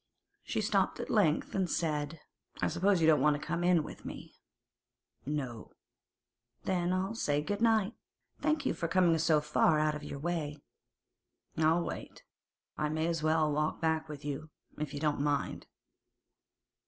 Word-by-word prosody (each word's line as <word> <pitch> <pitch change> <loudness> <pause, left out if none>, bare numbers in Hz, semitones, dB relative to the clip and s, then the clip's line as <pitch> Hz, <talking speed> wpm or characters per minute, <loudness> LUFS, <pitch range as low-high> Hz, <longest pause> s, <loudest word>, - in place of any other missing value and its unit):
She - - -2
stopped - - +1
at - - -4
length, 170 -8 +2
and 190 -3 0
said: 150 -1 -1 0.4
'I - - +1
suppose 180 +2 +2
you - - +4
don't 155 -4 +5
want 150 0 +3
to - - -9
go 165 - -2
in 175 -2 +4
with - - -10
me?' - - -8 0.9
'No.' 130 -7 -4 0.9
'Then 180 -2 0
I'll 190 +3 0
say 145 -10 0
good 205 +6 -3
night. 225 -2 +3 0.5
Thank 305 -1 0
you - - +2
for 165 - -2
coming 175 -1 +4
so 155 -1 +4
far 150 +1 +3
out 155 0 +2
of 150 0 -6
your 145 - -6
way.' 150 -1 -2 1.0
'I'll 160 +2 +3
wait. - - -7 0.6
I 150 0 +1
may 155 +1 0
as 165 -1 -1
well 155 -1 +2
walk 150 +1 0
back 160 -1 0
with 145 -1 -8
you, 150 +2 -4 0.3
if 150 -2 -3
you 145 - -5
don't 150 -2 0
mind. 145 -1 -1
155 Hz, 165 wpm, -32 LUFS, 150-175 Hz, 1.0 s, don't